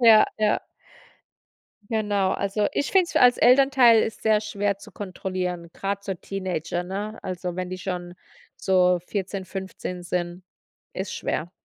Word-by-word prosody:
Ja, 225 -3 +8
ja. 215 -1 +2 1.3
Genau. 205 -3 +1
Also, 200 +1 0
ich 285 - -1
finde 380 -2 +5
es - - -10
f - - +5
als 245 -1 +6
Elternteil 250 -3 +6
ist 220 - -5
sehr 215 -1 +3
schwer 205 -2 -1
zu - - -14
kontrollieren, 180 -3 -4
grad 200 0 -3
so 195 - -2
Teenager, 180 -2 -3
ne? 205 +4 -5
Also, 180 -1 -4
wenn 185 0 -4
die 185 - -5
schon 180 -2 -4 0.4
so 180 -1 +3
14, 195 -1 -3
15 185 -1 -6
sind, 175 +1 -3 0.5
ist 190 +1 -4
schwer. 170 +3 -3
195 Hz, 150 wpm, -25 LUFS, 180-215 Hz, 1.3 s, Ja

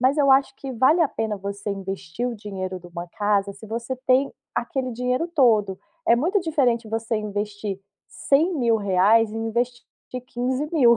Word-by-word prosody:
mas 265 +4 +3
eu 275 -2 +4
acho 270 0 +4
que 270 - -7
vale 260 +9 +4
a 320 - +4
pena 220 -4 -2
você 200 +1 -5
investir 195 +3 -4
o 240 - -4
dinheiro 190 -3 -5
de 175 - -13
uma 175 0 -7
casa 205 +1 0
se 200 +3 -12
você 235 +4 -4
tem 260 +2 +4 0.2
aquele 255 +1 -2
dinheiro 250 +6 0
todo. 220 - +3 0.3
É 235 - +6
muito 350 - +2
diferente 255 -9 +1
você 225 0 -1
investir 205 -1 -4 0.3
R$100.000 225 - +3
e 225 - -5
investir 235 +2 -1 0.3
de 255 - -3
15.000. 250 +1 +2
230 Hz, 165 wpm, -24 LUFS, 205-260 Hz, 0.3 s, É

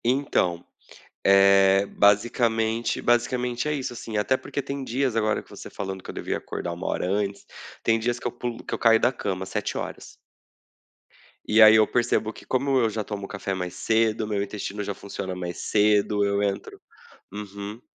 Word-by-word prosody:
Então, 120 -9 +1 0.6
eh, 100 0 +5
basicamente 110 +3 +1
basicamente 120 +2 0
é - - 0
isso 135 -4 -3
assim, 115 -2 -6
até 130 +5 +2
porque 140 - -5
tem 140 0 -5
dias 130 -1 -1
agora 110 -1 +1
que - - -26
você - - -10
falando 95 -1 -5
que - - -8
eu - - -9
devia - - -3
acordar 85 - -5
1 85 +2 -5
hora - - -1
antes, 100 0 -2 0.4
tem 115 0 +2
dias 120 +2 -1
que - - -7
eu 120 - -1
pulo 120 -1 -5
que - - -4
eu - - -3
caio 115 -1 +5
da 120 - +3
cama 95 -6 -4
7h. - - -4 1.3
E 110 +1 +5
aí 110 0 +9
eu 110 -1 +5
percebo 120 -2 +1
que - - -14
como 135 +1 +1
eu 115 -2 +2
já 110 0 -3
tomo 100 -1 -6
café 100 0 -4
mais 90 -1 -4
cedo, 110 +3 +1
o - - -7
meu 105 -2 -1
intestino 105 0 -5
já 100 - -3
funciona 95 -1 -6
mais 90 -1 -5
cedo, 105 0 +2
eu 100 0 +1
entro 100 -1 -3 0.5
uhum. 100 +1 -7
105 Hz, 185 wpm, -25 LUFS, 100-120 Hz, 1.3 s, aí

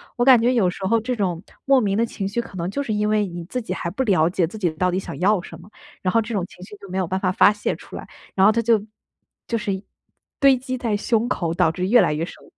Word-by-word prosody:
我 240 - +1
感 255 -3 +7
觉 245 +2 +3
有 205 -7 +3
时 190 +1 -6
候 230 +2 +3
这 250 +3 -2
种 185 -5 -2 0.2
莫 275 -1 +5
名 200 -1 0
的 230 - +2
情 200 -4 -4
绪 230 +5 -2
可 230 - -13
能 175 0 -3
就 280 - -2
是 230 -6 -2
因 210 0 0
为 215 -1 +2
你 175 -1 -7
自 250 +7 -4
己 185 - -4
还 170 - -4
不 260 +8 -1
了 185 -9 +3
解 175 -2 0
自 220 - -9
己 180 -5 0
到 180 +4 0
底 180 - -1
想 - - -7
要 200 +2 +3
什 165 -1 -11
么， 185 +5 -15 0.3
然 185 - 0
后 230 - +4
这 225 +1 -6
种 195 - 0
情 180 - -14
绪 205 +2 -11
就 200 - -13
没 185 - -4
有 185 - +1
办 190 +3 -2
法 185 - 0
发 200 - +5
泄 210 0 -2
出 - - -12
来。 - - -9 0.3
然 190 0 +4
后 - - +6
它 230 - +1
就 225 -2 +3 0.7
就 230 - -1
是 210 -2 -2
一 190 +1 -5 0.6
堆 275 -3 +5
积 255 0 -4
在 230 -4 -1
胸 225 +2 0
口， 170 -9 -1
导 165 - +3
致 185 +2 -3
越 240 +3 +6
来 - - +2
越 155 +2 -2
深。 - - -13
205 Hz, 320 characters per minute, -22 LUFS, 185-230 Hz, 0.7 s, 感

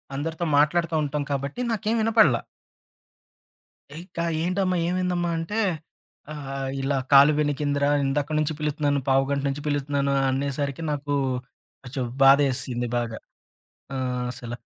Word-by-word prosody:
అందరితో 160 +4 -3
మాట్లాడుతూ 165 +2 +2
ఉంటాం 145 0 -2
కాబట్టి 140 - -3
నాకేం 220 +1 0
వినపడల. 220 - +4 1.6
ఇంకా 170 -1 -5 0.2
ఏంటమ్మా, 185 +1 0
ఏమైందమ్మా? 180 -1 0
అంటే 205 +7 -2 0.7
ఆహ్, 135 -2 -5
"ఇలా 135 0 0
కాలు 140 +2 +8
వెణికిందిరా. 145 -1 0 0.2
ఇందాక 145 +2 -1
నుంచి 155 +1 0
పిలుస్తున్నాను, 145 -2 0
పావుగంట 135 +1 +2
నుంచి 140 +1 -4
పిలుస్తున్నాను" 140 -1 0 0.2
అనేసరికి 140 +2 -2
నాకు 145 0 -3 0.7
కొంచెం 130 +1 -4 0.2
బాధేసింది 135 -3 +3
బాగా. 115 -2 -3 0.8
ఆహ్, 125 -1 -2
అసలు 120 -1 -7
145 Hz, 110 wpm, -25 LUFS, 135-165 Hz, 1.6 s, కాలు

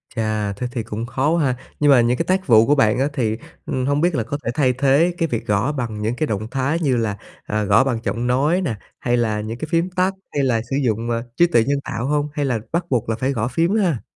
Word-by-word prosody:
Chà, 110 -3 -1
thế 115 +5 -4
thì 120 -2 -3
cũng 110 +2 -5
khó 130 +4 0
quá 165 -1 +2
ha. 130 -2 +1 0.2
Nhưng 145 -1 +5
mà 130 -3 +6
những 120 +1 +2
cái - - -1
tác 185 0 0
vụ 115 -3 +6
của 145 - +4
bạn 115 -3 +3
á 135 - +2
thì, 110 -6 -1 0.3
ừm, 130 -1 -2
hông 145 +2 +1
biết 175 -1 +2
là 120 - 0
có 145 - -4
thể - - -2
thay 130 -2 +2
thế 140 +7 +3
cái 165 - +1
việc 115 -6 -3
gõ 105 +7 +1
bằng 115 -7 -4
những 110 +3 -1
cái 155 +3 -1
động 110 -2 -3
thái 140 +5 0
như 135 -7 +1
là, 110 -3 -1 0.3
à, 105 0 -1
gõ 100 +5 +4
bằng 125 -4 -1
giọng 120 +2 -2
nói 145 +9 +2
nè, 130 -11 -2 0.2
hay 120 0 +1
là 110 -3 0
những 110 +2 -5
cái 155 - -5
phím 170 +2 +1
tắt, 185 +1 +1 0.2
hay 140 - +1
là 115 -4 +1
sử 135 - -1
dụng, 115 0 -1
ờ, 115 0 -1
trí 175 - +5
tuệ 120 -10 +3
nhân 140 +3 0
tạo 115 +2 -4
hông? 150 0 0
Hay 145 -1 -1
là 125 -4 0
bắt 170 +1 0
buộc 120 -4 0
là 110 - +1
phải 130 +5 -1
gõ 110 -3 -1
phím 165 - +1
ha? 175 - +1
125 Hz, 280 wpm, -21 LUFS, 115-145 Hz, 0.3 s, mà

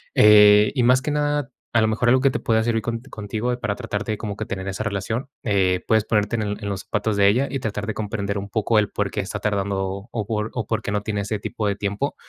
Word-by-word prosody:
Eh, 105 0 +7
y 130 - +2
más 125 +2 +4
que 150 - -1
nada, 145 -2 0 0.2
a 120 - +4
lo 110 - +3
mejor, 115 +2 +1
algo 130 +1 +4
que 135 - +4
te - - -2
pueda 110 -1 +1
servir 115 -1 0
con 115 +2 -3
contigo 115 0 -4
para 105 -4 -2
tratar 105 -4 -4
de 110 -1 -2
como 105 -2 -5
que 110 - -4
tener 95 -1 -5
esa 95 +3 -3
relación, 110 +5 -3
eh, 95 -4 +2
puedes 110 -1 +3
ponerte 105 +1 +1
en 110 - -1
el 105 0 -3
en 100 - -2
los 100 0 -3
zapatos 105 0 -1
de 100 -1 +5
ella 130 +7 +2
y 135 - -2
tratar 105 -3 -3
de 110 - -2
comprender 100 -1 -3
un 100 +1 -7
poco 110 +1 +2
el 105 -1 0
porqué 100 -1 -2
está 110 +2 -5
tardando, 100 -1 -2
o 110 -3 -3
por 105 0 -2
o 120 -4 -3
por - - -1
qué - - -4
no 105 0 0
tiene 105 -1 -2
ese 105 +1 -2
tipo 105 +1 -3
de 100 - 0
tiempo. 100 +8 -2
105 Hz, 265 wpm, -23 LUFS, 100-115 Hz, 0.2 s, Eh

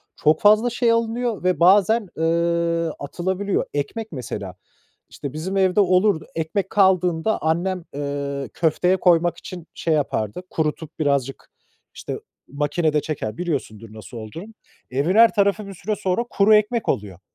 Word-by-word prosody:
Çok 155 +1 +2
fazla 215 +3 +5
şey 240 0 +1
alınıyor 230 -1 -1
ve 185 0 +1
bazen, 200 +4 +4
eee, 170 0 +1
atılabiliyor. 185 +7 -2
Ekmek 180 +11 -4
mesela; 130 -8 -6 0.5
işte, 140 -2 -7
bizim 180 +6 -3
evde 190 0 +3
olurdu. 185 -3 +3
Ekmek 165 +4 -2
kaldığında 185 0 +2
annem, 175 +3 -1
eee, 140 -2 -4
köfteye 180 +3 +1
koymak 175 -2 +3
için 175 -3 -9
şey 165 - -1
yapardı, 140 - -1
kurutup 160 0 -3
birazcık, 140 -3 -1 0.4
işte, - - -6 0.3
makinede 150 +2 0
çeker, 115 -9 -4
biliyorsundur 115 - -4
nasıl 110 +2 -10
olduğunu. 165 - -9 0.4
Evin 145 +9 0
her 230 +1 +7
tarafı 200 0 +1
bir 195 - -8
süre 210 +4 -3
sonra 195 +2 -1
kuru 205 +2 +4
ekmek 215 +2 +1
oluyor. 100 -4 -2
170 Hz, 140 wpm, -22 LUFS, 150-200 Hz, 0.5 s, her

